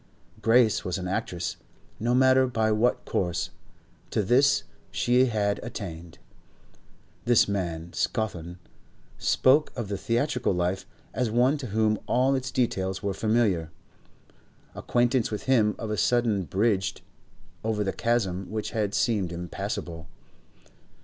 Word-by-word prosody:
Grace 115 -1 +4
was 90 - -2
an 90 -1 -4
actress; 90 -1 -3 0.4
no 120 +3 +1
matter 130 0 +5
by 110 -3 +1
what 110 +3 +1
course, 90 -1 -1 0.6
to 105 - 0
this 135 +8 +4 0.3
she 125 +2 +3
had 100 -3 0
attained. 85 -8 -7 1.1
This 120 -2 +5
man, 85 -4 -3
Scawthorne, 90 -7 -2 0.6
spoke 145 +4 +3
of 115 -5 -4
the 100 -2 -3
theatrical 120 +2 0
life 90 +2 -1 0.3
as 125 -3 0
one 125 +5 +3
to 130 - -5
whom 110 0 +1
all 130 +2 +3
its 130 -1 -1
details 95 -7 -1
were 100 -1 -1
familiar; 105 -7 +1 1.0
acquaintance 120 0 +1
with 105 - -4
him 110 -5 +3
of 110 - -5
a 105 - -1
sudden 110 -1 +2
bridged 100 +2 0 0.6
over 110 -1 0
the 95 - -2
chasm 100 -6 -1
which 110 0 -4
had 105 -3 -1
seemed 105 -7 +1
impassable. 85 -1 -5
110 Hz, 130 wpm, -26 LUFS, 95-120 Hz, 1.1 s, matter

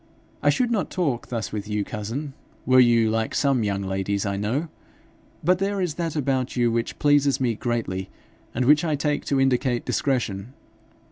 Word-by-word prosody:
I - - +3
should 250 -2 +1
not 215 -5 0
talk 145 -10 -1
thus 115 -3 -4
with 105 -1 -4
you, 105 -1 -1
cousin, 120 +8 -5 0.3
were 130 0 +5
you 115 -3 +5
like 110 0 -1
some 135 -5 +2
young 100 -1 -1
ladies 95 +1 -1
I 100 -1 -1
know; 115 +11 -1 0.8
but 180 +3 +3
there 200 +1 -1
is 180 -5 -1
that 165 -1 -3
about 135 -3 -1
you 120 -2 +2
which 115 0 -2
pleases 145 -1 +3
me 125 -3 +1
greatly, 110 -5 -3 0.4
and 130 - -1
which 150 +4 +5
I 155 -3 +1
take 145 0 -1
to 140 - +1
indicate 130 -2 +1
discretion. 120 -4 -1
125 Hz, 180 wpm, -24 LUFS, 110-145 Hz, 0.8 s, were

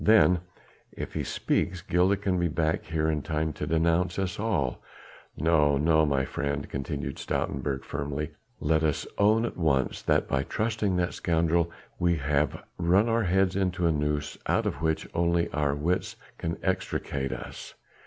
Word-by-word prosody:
"Then, 105 -5 +6 0.5
if - - -6
he - - -1
speaks, 90 -2 -1
Gilda 90 +4 +3
can 95 -2 0
be 85 - +2
back 80 0 0
here 80 -1 0
in 75 -2 0
time 75 +2 -1
to - - -4
denounce 85 +3 +2
us 95 0 -2
all. 95 - 0 0.6
No, 75 -3 +3
no, 80 +1 +4
my 70 -2 +1
friend," 70 +1 -2
continued 70 0 -4
Stoutenburg 70 0 -2
firmly, 75 +1 -3 0.3
"let 80 +1 +2
us 75 -2 0
own 110 +3 +4
at - - -5
once 75 -7 +1
that - - +2
by - - +1
trusting 110 -3 -1
that 90 0 0
scoundrel 85 0 +1 0.3
we 85 -1 +3
have 75 0 0 0.2
run 90 +6 +4
our 115 -1 +2
heads 95 +1 +2
into 95 -2 0
a 85 - +4
noose 75 -1 -1
out - - +2
of 70 - -2
which 80 -1 0
only 85 0 +2
our 75 -2 +1
wits 85 +5 -1 0.2
can 85 0 -2
extricate 70 -7 -1
us. - - -7
80 Hz, 165 wpm, -28 LUFS, 75-90 Hz, 0.6 s, Then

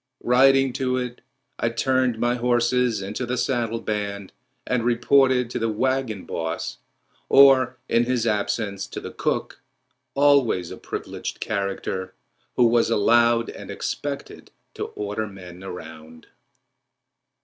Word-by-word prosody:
Riding 135 +1 +4
to 130 0 -1
it, 125 -1 -4 0.4
I 115 - +1
turned 130 0 +1
my 120 +2 +1
horses 120 -2 +1
into 105 +6 -4
the 125 +1 -2
saddle 115 -4 -1
band 100 -3 -4 0.3
and 125 -2 0
reported 125 +1 +3
to - - -2
the 115 - 0
wagon 115 -4 -1
boss, 80 -1 -4 0.5
or, 130 -2 +6
in 120 +1 +2
his 125 -2 0
absence, 100 -2 -1
to - - -6
the - - -8
cook—always 140 -11 -1
a - - -7
privileged - - -6
character, 95 -2 -3 0.4
who 125 - +4
was 115 0 +3
allowed 115 +1 +3
and - - -10
expected 145 -1 -5 0.2
to - - -4
order 105 +1 -4
men 90 -2 -11
around. 80 -3 -10
115 Hz, 125 wpm, -23 LUFS, 100-125 Hz, 0.5 s, or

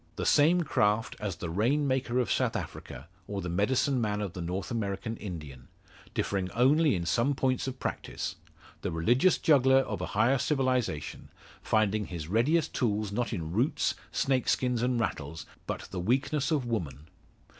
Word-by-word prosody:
The - - -3
same 165 +5 +5
craft 105 -6 +1
as 100 -4 -3
the 85 -1 -5
rain 130 - +1
maker 130 -2 0
of 125 -6 +1
South - - +1
Africa, 65 +6 -6 0.2
or 100 -1 -3
the 90 -2 -4
medicine 125 - +1
man 105 -2 0
of 100 -4 -3
the 90 - -6
North 90 +7 -4
American 105 -1 -2
Indian; 75 -10 -8 0.5
differing 95 -2 -1
only 140 +4 +4
in 85 -1 -2
some 120 - +1
points 130 -1 0
of 130 0 -4
practice; - - -4 0.5
the - - -2
religious 120 - +3
juggler 135 -3 +5
of - - -4
a - - -2
higher 120 +5 +4
civilisation, 130 - -1 0.3
finding 110 -1 +1
his 85 -4 -6
readiest 145 - +2
tools 105 -4 0
not 115 +1 -1
in 80 -2 -4
roots, 120 - +1 0.2
snake 130 -2 +1
skins, 125 -2 +1
and 125 -1 +1
rattles, 80 -7 -3 0.2
but - - -3
the 95 - -4
weakness 135 +9 0
of 150 -6 +1
woman. 80 - -3
115 Hz, 165 wpm, -29 LUFS, 95-130 Hz, 0.5 s, same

